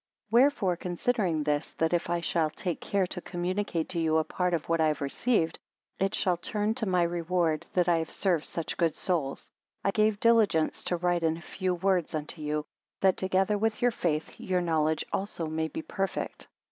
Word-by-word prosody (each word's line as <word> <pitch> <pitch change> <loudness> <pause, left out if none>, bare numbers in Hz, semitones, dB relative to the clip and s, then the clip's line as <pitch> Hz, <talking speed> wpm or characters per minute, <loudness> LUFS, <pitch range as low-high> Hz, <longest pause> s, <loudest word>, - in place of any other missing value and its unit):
6 - - -38
Wherefore 235 -7 +4
considering 180 -2 0
this, 145 0 -1
that 165 +1 0
if 170 -1 0
I 175 0 0
shall 165 -2 +1
take 175 +2 -4
care 200 -2 +1
to 180 0 -5
communicate 175 -1 -2
to 170 - -2
you 160 -1 +2
a 160 - +3
part 180 +2 0
of 160 0 -4
what 165 -1 +2
I 160 - +4
have 155 -1 0
received, 165 - 0 0.4
it 195 0 +1
shall 180 -2 +1
turn 210 +4 -1
to 225 -3 -2
my 180 -2 +3
reward, 170 -2 0
that 180 -1 +2
I 170 -1 +4
have 160 - -3
served 175 -6 0
such 165 - -4
good 165 -3 +2
souls. 160 -7 -2 0.3
I 195 - +2
gave 215 0 +2
diligence 220 -9 +3
to 175 - 0
write 175 0 +1
in 160 0 +1
a - - -10
few 185 +1 -2
words 180 -2 +1
unto 155 +1 -5
you; 150 0 -1 0.4
that 190 -1 +4
together 190 +2 +1
with 220 +1 0
your 245 - +5
faith, 160 -7 -2
your 185 -1 0
knowledge 160 -3 +1
also 190 -4 -2
may 160 0 -1
be 160 - -6
perfect. 195 0 -3
175 Hz, 200 wpm, -29 LUFS, 160-195 Hz, 0.4 s, your